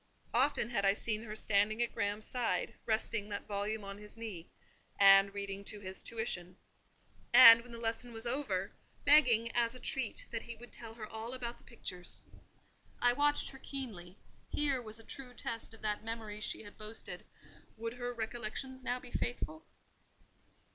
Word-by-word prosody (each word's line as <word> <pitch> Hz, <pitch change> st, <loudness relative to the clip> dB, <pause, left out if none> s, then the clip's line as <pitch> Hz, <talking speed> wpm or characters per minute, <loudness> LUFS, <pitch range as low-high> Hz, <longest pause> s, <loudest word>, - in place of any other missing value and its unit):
Often 245 Hz, -1 st, +2 dB
had 200 Hz, -4 st, 0 dB
I 195 Hz, 0 st, +5 dB
seen 215 Hz, +1 st, -1 dB
her 215 Hz, -1 st, -6 dB
standing 215 Hz, +1 st, +2 dB
at 235 Hz, -, -3 dB
Graham's 205 Hz, -1 st, 0 dB
side, 245 Hz, -2 st, +1 dB
resting 220 Hz, -1 st, 0 dB
that 205 Hz, -1 st, -4 dB
volume 205 Hz, +1 st, -2 dB
on 200 Hz, 0 st, -7 dB
his 210 Hz, +1 st, -10 dB
knee, 210 Hz, -8 st, -6 dB, 0.5 s
and 195 Hz, 0 st, +8 dB
reading 200 Hz, 0 st, -5 dB
to 210 Hz, 0 st, -8 dB
his 190 Hz, -1 st, -4 dB
tuition; 185 Hz, -6 st, -2 dB, 0.7 s
and, 230 Hz, -2 st, +11 dB
when 245 Hz, +1 st, -13 dB
the 235 Hz, -, -7 dB
lesson 230 Hz, +1 st, -2 dB
was 225 Hz, 0 st, -6 dB
over, 265 Hz, +5 st, -1 dB, 0.3 s
begging, 245 Hz, -6 st, +6 dB
as 235 Hz, 0 st, +1 dB
a -, -, -9 dB
treat, 255 Hz, -2 st, -1 dB
that 225 Hz, -1 st, -2 dB
he 235 Hz, -, -7 dB
would 240 Hz, +2 st, -13 dB
tell 225 Hz, -1 st, -7 dB
her 220 Hz, -2 st, -6 dB
all 225 Hz, +3 st, -6 dB
about 240 Hz, -2 st, -5 dB
the -, -, -23 dB
pictures. 180 Hz, -6 st, -7 dB, 0.8 s
I 245 Hz, 0 st, +4 dB
watched 290 Hz, +2 st, +2 dB
her 270 Hz, -, -12 dB
keenly: 210 Hz, -11 st, -7 dB, 0.3 s
here 280 Hz, -4 st, +1 dB
was 220 Hz, -1 st, -7 dB
a 225 Hz, -, -11 dB
true 250 Hz, +1 st, -9 dB
test 230 Hz, -1 st, -5 dB
of 225 Hz, -, -15 dB
that 210 Hz, 0 st, -1 dB
memory 220 Hz, -2 st, -5 dB
she 215 Hz, -, -2 dB
had 205 Hz, -, -13 dB
boasted; 215 Hz, +1 st, -7 dB, 0.5 s
would 230 Hz, +1 st, -4 dB
her 245 Hz, 0 st, -4 dB
recollections 240 Hz, +3 st, -5 dB
now 250 Hz, 0 st, -1 dB
be 250 Hz, -1 st, -12 dB
faithful? 310 Hz, +6 st, -3 dB
225 Hz, 175 wpm, -34 LUFS, 210-245 Hz, 0.8 s, and